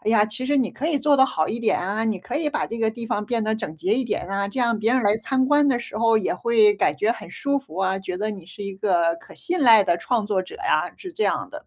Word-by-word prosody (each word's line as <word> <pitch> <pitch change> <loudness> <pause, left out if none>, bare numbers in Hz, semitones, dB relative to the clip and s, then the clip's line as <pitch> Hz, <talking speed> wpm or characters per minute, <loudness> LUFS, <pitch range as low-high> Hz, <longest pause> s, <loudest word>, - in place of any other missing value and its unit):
“哎 215 - -1
呀， 210 -2 +4
其 225 +4 -4
实 285 0 +1
你 255 -4 +1
可 290 - -4
以 300 -4 +1
做 290 +1 +3
得 265 -1 +5
好 155 -9 -1
一 235 +2 -4
点 225 - +2
啊， 200 +5 -2
你 215 -4 -1
可 180 - -5
以 305 -1 0
把 300 - -2
这 230 - -6
个 220 -1 +1
地 235 0 -7
方 210 -1 -2
变 230 -3 -1
得 220 0 0
整 195 -8 -6
洁 185 +6 -1
一 260 - +2
点 235 -6 -3
啊， 200 +1 -2
这 260 - -6
样 235 -2 +1
别 225 +3 +1
人 255 - +2
来 205 0 +3
参 260 +3 0
观 290 +1 +3
的 245 -3 +2
时 220 -2 -7
候 230 -1 +3
也 210 -4 0
会 220 +1 +4
感 150 -7 +1
觉 220 +3 +1
很 - - -11
舒 280 0 -1
服 270 - -13
啊， 190 0 0
觉 185 -1 -5
得 210 +3 -2
你 190 -5 -9
是 200 - -10
一 200 - -5
个 175 -4 +1
可 - - -16
信 355 -1 -2
赖 225 -6 +7
的 175 -1 +1
创 230 -5 -1
作 195 -3 0
者 185 - -12
呀”， 390 - 0
是 365 -3 -9
这 435 - -2
样 - - -1
的。 - - -10
220 Hz, 330 characters per minute, -23 LUFS, 195-255 Hz, -, 赖